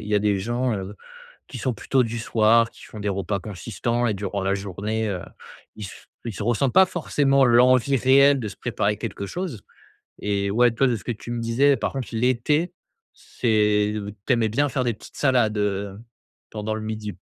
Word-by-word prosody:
il - - -8
y 105 - +1
a 105 - +5
des 100 -1 +1
gens, 120 +5 -1
heu, 95 +1 -6 0.5
qui - - -8
sont 125 +1 -1
plutôt 130 +4 +1
du 115 0 -4
soir, 115 +1 +3
qui - - -17
font 110 - -10
des 105 0 -2
repas 100 +1 -2
consistants 115 +5 -2
et 110 - +1
durant 100 0 -3
la 100 +1 +1
journée, 105 +3 -3
heu, 90 -3 -3 0.5
ils 105 - -8
s 95 - -12 0.2
ils 115 - -4
se 100 - -5
ressentent 120 +3 +1
pas 190 - +7
forcément 140 -6 +2
l'envie 125 +2 +4
réelle 140 +2 +5
de 115 - -4
se - - -12
préparer - - -1
quelque 100 - -5
chose 160 - -5 0.6
et 100 -1 -1
ouais, 120 +3 +4
toi, 130 +4 +2
de 120 - +1
ce 100 - -8
que - - -3
tu 115 +1 -8
me 120 - -2
disais 130 +5 +3
par - - -2
contre 135 -3 -4
l'été, 130 +8 +1 0.4
c'est, 105 -3 +1
heu, 105 -1 -5
tu 130 - +3
aimais 115 -2 +1
bien 140 +7 +1
faire 130 -1 -1
des 120 -2 0
petites - - -15
salades, 125 -6 +2
heu, 100 -1 -2 0.5
pendant 110 0 -4
le 110 - -5
midi. 110 -1 -5
115 Hz, 210 wpm, -23 LUFS, 105-125 Hz, 0.6 s, pas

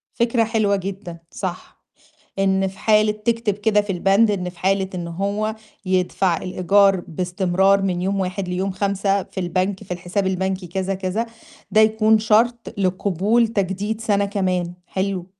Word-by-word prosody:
فكرة 235 -1 +2
حلوة 215 -3 +1
جدًا، 190 -2 -6
صح، 185 -2 -6 0.6
إن 195 0 +2
في 190 +1 -12
حالة 215 0 +3
تكتب 225 0 -1
كده 210 +1 +2
في 205 -1 -3
البند 195 +5 +3
إن 180 -3 -2
في 175 - -12
حالة 190 0 +1
إن 170 -1 -4
هو 200 +5 -2 0.3
يدفع 185 -1 +1
الإيجار 190 +2 +3
باستمرار 185 +3 +1
من 180 -2 -1
يوم 195 +1 0
1 185 0 -3
ليوم 185 +2 -1
5 195 +1 0
في 190 - -7
البنك 185 +3 -1
في - - -23
الحساب 180 +3 -2
البنكي 190 0 -1
كذا، 190 +2 -2
كذا، 190 +5 -2 0.4
ده 215 - +4
يكون 220 0 +4
شرط 230 +2 +1
لقبول 200 +4 +1
تجديد 205 +1 -2
سَنة 205 -2 +1
كمان، 185 -3 -1
حلو. 190 -2 -2
195 Hz, 150 wpm, -21 LUFS, 185-210 Hz, 0.6 s, ده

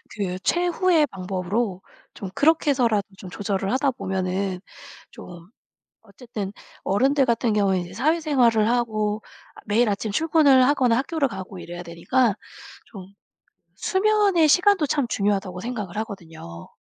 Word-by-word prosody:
그 185 -3 -4
최후의 350 - +2
방법으로 190 +1 -3 0.3
좀 195 - -7
그렇게 310 +2 +3
해서라도 230 -7 +1
좀 185 - -9
조절을 195 +1 -2
하다 270 +2 +2
보면은 190 -3 -3 0.5
좀 175 0 -12 0.5
어쨌든 210 -2 -7 0.3
어른들 265 +7 +2
같은 235 -1 +1
경우에는 195 -3 +1
이제 175 +1 -11
사회생활을 255 - +2
하고 215 -3 -1 0.4
매일 220 +3 +2
아침 205 +1 -3
출근을 295 -3 +4
하거나 255 -4 +2
학교를 295 0 -1
가고 190 -3 -8
이래야 175 0 -8
되니까 180 +8 0 0.5
좀 190 -4 -11 0.7
수면의 395 -5 +2
시간도 360 0 +4
참 280 -2 0
중요하다고 195 -4 -1
생각을 210 -5 -5
하거든요. 165 - -8
220 Hz, 315 characters per minute, -23 LUFS, 190-275 Hz, 0.7 s, 출근을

